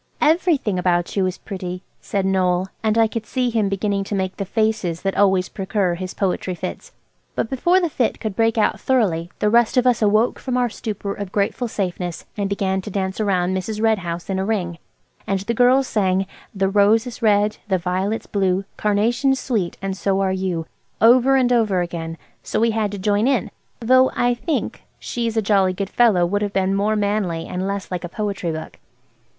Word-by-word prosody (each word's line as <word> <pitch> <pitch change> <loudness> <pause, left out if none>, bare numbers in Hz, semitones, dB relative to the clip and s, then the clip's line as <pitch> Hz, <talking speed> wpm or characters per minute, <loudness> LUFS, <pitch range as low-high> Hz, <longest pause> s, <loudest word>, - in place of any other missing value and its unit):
"Everything 305 - +2
about 175 -1 0
you 190 -2 +2
is 185 - -4
pretty," 185 -1 -6 0.2
said 195 -2 -2
Noël. 185 -1 +2 0.2
And 220 0 +1
I 225 - +6
could 220 0 -4
see 250 -2 0
him 220 -3 +1
beginning 200 0 -1
to 205 - -3
make 190 -1 -2
the 200 - -3
faces 215 -5 -1
that 195 0 -1
always 190 -2 +3
precur 190 -2 -1
his 185 +1 -6
poetry 185 -1 -1
fits. - - -6 0.4
But 225 - -2
before 345 +8 +3
the 350 - +1
fit 255 -7 -1
could 215 -3 -4
break 225 +1 +2
out 215 - +2
thoroughly 185 -10 +1
the 210 - +1
rest 235 +2 +3
of 250 - +4
us 245 -2 +3
awoke 215 +3 +2
from 255 -2 -2
our 245 -1 +2
stupor 205 -3 -4
of 200 -2 -6
grateful 210 +5 0
safeness 180 -5 -4
and 200 -2 -2
began 190 -1 0
to 200 - -7
dance 190 +1 -2
round 185 -3 +1
Mrs. 210 +3 -3
Red 220 -1 +2
House 170 -1 -5
in 190 -1 -1
a - - 0
ring. 185 -5 -2 0.5
And 195 -1 0
the 230 +4 -2
girls 250 +3 +4
sang– 190 -2 +1 0.3
"The 195 0 +1
rose 205 +3 +4
is 245 -1 -8
red, 210 -1 +3
the 190 -2 +2
violet's 185 +5 -2
blue, 190 -1 0
Carnation's 235 +6 +1
sweet, 210 -9 -2
and 195 -1 -2
so 195 0 0
are 190 -1 +1
you," 185 -3 -2 0.3
over 250 +4 +6
and 250 -2 +3
over 215 -6 +2
again, 165 -1 -5 0.2
so - - -2
we 230 +1 +3
had 215 -2 -1
to - - -4
join 205 +4 +1
in; 265 -3 +1 0.3
though 255 +2 +4
I 245 0 +2
think 290 +6 -3 0.2
"She's 230 -2 -3
a 220 - +2
jolly 195 -2 +3
good 195 +1 -4
fellow" 215 -8 +4
would 205 +4 -1
have 205 -1 -2
been 190 0 +1
more 205 +2 +1
manly 200 -5 -1
and 185 +1 -3
less 200 -1 -4
like 180 -1 -3
a 175 - -5
poetry 200 -4 -3
book. 160 0 -7
200 Hz, 200 wpm, -21 LUFS, 185-225 Hz, 0.5 s, I